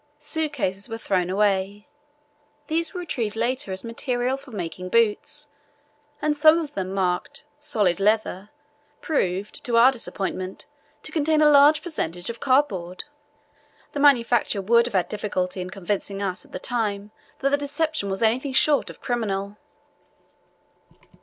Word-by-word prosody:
Suitcases 295 - -2
were 225 - -4
thrown 185 -5 0
away; 200 +1 0 0.8
these 325 +2 0
were 360 - -5
retrieved 235 -11 -3
later 235 -2 -1
as 190 0 -3
material 245 +2 -1
for 275 0 -13
making 185 -3 -5
boots, 230 +7 +1 0.7
and 300 0 +2
some 310 +2 +6
of 310 -3 -4
them, 190 -1 -3
marked 195 +10 -2
"solid 210 - +1
leather," 210 -1 +1 0.5
proved, 195 - -2
to 235 -2 +1
our 245 +3 +7
disappointment, 190 -6 -4 0.4
to - - -6
contain 310 -1 +2
a 305 - +6
large 290 +1 +6
percentage 180 - -3
of 235 - -12
cardboard. 205 -11 +1 0.9
The 290 - -4
manufacturer 240 -7 +3
would 235 +3 +4
have 245 - -7
had 185 - +2
difficulty 185 -3 -2
in 180 - -5
convincing 195 +1 -3
us 190 -2 -3
at - - -21
the - - -4
time 210 -2 -2 0.3
that 275 - +1
the - - +5
deception 290 -5 -2
was 195 +3 -2
anything 255 +5 +1
short 285 +2 +3
of - - -12
criminal. 205 -4 -2
225 Hz, 145 wpm, -24 LUFS, 195-285 Hz, 0.9 s, our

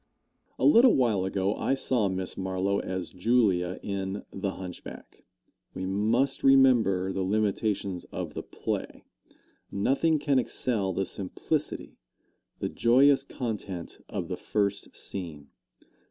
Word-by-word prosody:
A - - 0
little 250 -2 +7
while 110 -7 +2
ago 95 +1 0
I 135 - +1
saw 120 -6 +1
Miss 95 0 -2
Marlowe 95 +1 -1
as 95 -2 -4
Julia, 95 -3 +1
in 100 0 -4
"The 95 0 -3
Hunchback." 90 -2 -10 0.5
We 95 - -3
must 110 +8 +1
remember 120 -9 +4
the 95 - -2
limitations 100 -2 -1
of - - -6
the - - -4
play. - - -5 0.7
Nothing 140 +10 +2
can 140 -2 +2
excel 110 -5 0
the 95 +2 -1
simplicity, 120 - -3 0.6
the - - -2
joyous 135 +4 +4
content 105 -10 -5
of - - -4
the - - -4
first 100 -1 -2
scene. 80 -7 -5
100 Hz, 125 wpm, -28 LUFS, 95-125 Hz, 0.7 s, little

